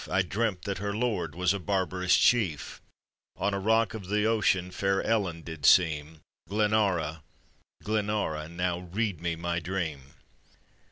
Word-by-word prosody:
I 95 Hz, -, +2 dB
dreamt 100 Hz, 0 st, -2 dB
that 100 Hz, -2 st, -3 dB
her 100 Hz, 0 st, -3 dB
lord 105 Hz, -9 st, -1 dB
was 90 Hz, +1 st, +2 dB
a 100 Hz, -, -3 dB
barbarous 95 Hz, -1 st, +1 dB
chief; 85 Hz, -, +1 dB, 0.6 s
On 100 Hz, -, 0 dB
a 100 Hz, -, -1 dB
rock 110 Hz, +2 st, +2 dB
of 105 Hz, -5 st, -7 dB
the 105 Hz, +2 st, +1 dB
ocean 100 Hz, -5 st, +2 dB
fair 95 Hz, +1 st, 0 dB
Kllen 95 Hz, -7 st, -1 dB
did 80 Hz, -3 st, -8 dB
seem; 80 Hz, -2 st, +3 dB, 0.3 s
Glenara! 100 Hz, -7 st, +1 dB, 0.6 s
Glenara! 105 Hz, -8 st, -1 dB
now 90 Hz, +1 st, -2 dB
read 90 Hz, 0 st, -3 dB
me 85 Hz, -1 st, -1 dB
my 85 Hz, +1 st, -2 dB
dream!" 80 Hz, -6 st, -4 dB
95 Hz, 145 wpm, -28 LUFS, 85-105 Hz, 0.6 s, seem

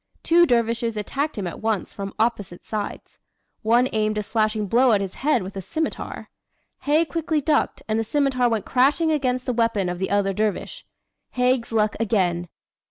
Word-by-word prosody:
Two 345 Hz, +1 st, +5 dB
dervishes 230 Hz, -2 st, +1 dB
attacked 275 Hz, +8 st, -2 dB
him 200 Hz, -, -3 dB
at 175 Hz, -, -5 dB
once 220 Hz, -3 st, -1 dB
from 195 Hz, -1 st, -5 dB
opposite 210 Hz, -6 st, -1 dB
sides. 215 Hz, -2 st, -5 dB, 0.4 s
One 240 Hz, +3 st, +3 dB
aimed 215 Hz, -1 st, 0 dB
a 210 Hz, -, -1 dB
slashing 215 Hz, 0 st, 0 dB
blow 240 Hz, +4 st, +4 dB
at 205 Hz, -, +3 dB
his 195 Hz, -2 st, -4 dB
head 270 Hz, -6 st, +1 dB
with 190 Hz, +2 st, -8 dB
a 195 Hz, -, -4 dB
scimitar. 315 Hz, -, -4 dB, 0.5 s
Haig 310 Hz, +3 st, +2 dB
quickly 320 Hz, 0 st, -1 dB
ducked 295 Hz, +1 st, 0 dB
and 220 Hz, 0 st, 0 dB
the -, -, 0 dB
scimitar 255 Hz, 0 st, +1 dB
went 225 Hz, -3 st, -1 dB
crashing 290 Hz, +6 st, +2 dB
against 255 Hz, -4 st, 0 dB
the 250 Hz, -, -1 dB
weapon 230 Hz, -5 st, +1 dB
of 175 Hz, 0 st, -4 dB
the 190 Hz, -, -1 dB
other 200 Hz, -1 st, +1 dB
dervish. 210 Hz, +1 st, -3 dB, 0.5 s
Haig's 250 Hz, -1 st, +1 dB
luck 215 Hz, -1 st, +1 dB
again! 180 Hz, -6 st, 0 dB
225 Hz, 175 wpm, -23 LUFS, 205-260 Hz, 0.5 s, Two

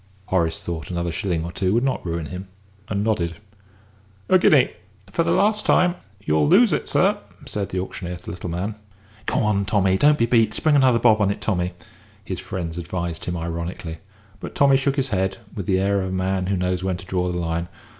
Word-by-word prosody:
Horace 85 Hz, -3 st, 0 dB
thought 80 Hz, -3 st, -5 dB
another 85 Hz, -1 st, -2 dB
shilling 90 Hz, -4 st, -2 dB
or 85 Hz, -, -5 dB
two 95 Hz, +3 st, 0 dB
would 120 Hz, -, +2 dB
not 135 Hz, -1 st, -1 dB
ruin 85 Hz, -2 st, -3 dB
him, 90 Hz, +4 st, -7 dB, 0.4 s
and 100 Hz, -1 st, -1 dB
nodded. 85 Hz, -6 st, 0 dB, 0.9 s
"A 185 Hz, -, +6 dB
guinea. 145 Hz, -7 st, +5 dB, 0.4 s
For -, -, +1 dB
the 165 Hz, -, +1 dB
last 210 Hz, +1 st, +3 dB
time. 180 Hz, -1 st, +4 dB, 0.3 s
You'll 75 Hz, -6 st, +1 dB
lose -, -, +6 dB
it, -, -, -1 dB
sir," -, -, +3 dB, 0.3 s
said 100 Hz, -2 st, -3 dB
the 95 Hz, -, -2 dB
auctioneer 90 Hz, -1 st, -5 dB
to 90 Hz, -, -19 dB
the -, -, -5 dB
little 90 Hz, +1 st, -6 dB
man. 90 Hz, +6 st, -2 dB, 0.5 s
"Go -, -, -1 dB
on, 105 Hz, -3 st, +1 dB
Tommy. 95 Hz, -2 st, +2 dB
Don't 150 Hz, +1 st, +5 dB
you 115 Hz, -, +4 dB
be 115 Hz, -1 st, +4 dB
beat. 110 Hz, -, 0 dB
Spring 155 Hz, -2 st, +3 dB
another 130 Hz, -4 st, +5 dB
bob 110 Hz, -2 st, +4 dB
on 100 Hz, -, +3 dB
it, 100 Hz, -, -2 dB
Tommy," 90 Hz, -3 st, -1 dB, 0.5 s
his 90 Hz, -, -4 dB
friends 90 Hz, -3 st, -4 dB
advised 85 Hz, -1 st, -4 dB
him 90 Hz, -1 st, -2 dB
ironically; 85 Hz, 0 st, -5 dB, 0.4 s
but -, -, -8 dB
Tommy 140 Hz, -5 st, +5 dB
shook 135 Hz, +1 st, +1 dB
his 135 Hz, -2 st, 0 dB
head, 95 Hz, -1 st, 0 dB, 0.2 s
with 100 Hz, -4 st, -5 dB
the 95 Hz, -1 st, +2 dB
air 100 Hz, +1 st, +1 dB
of 95 Hz, -, -3 dB
a -, -, -5 dB
man 95 Hz, 0 st, -1 dB
who 100 Hz, 0 st, 0 dB
knows 90 Hz, 0 st, -1 dB
when 95 Hz, -2 st, -1 dB
to 90 Hz, -, -11 dB
draw 90 Hz, -1 st, -1 dB
the 90 Hz, -, -3 dB
line. 85 Hz, 0 st, -2 dB
95 Hz, 215 wpm, -23 LUFS, 85-110 Hz, 0.9 s, A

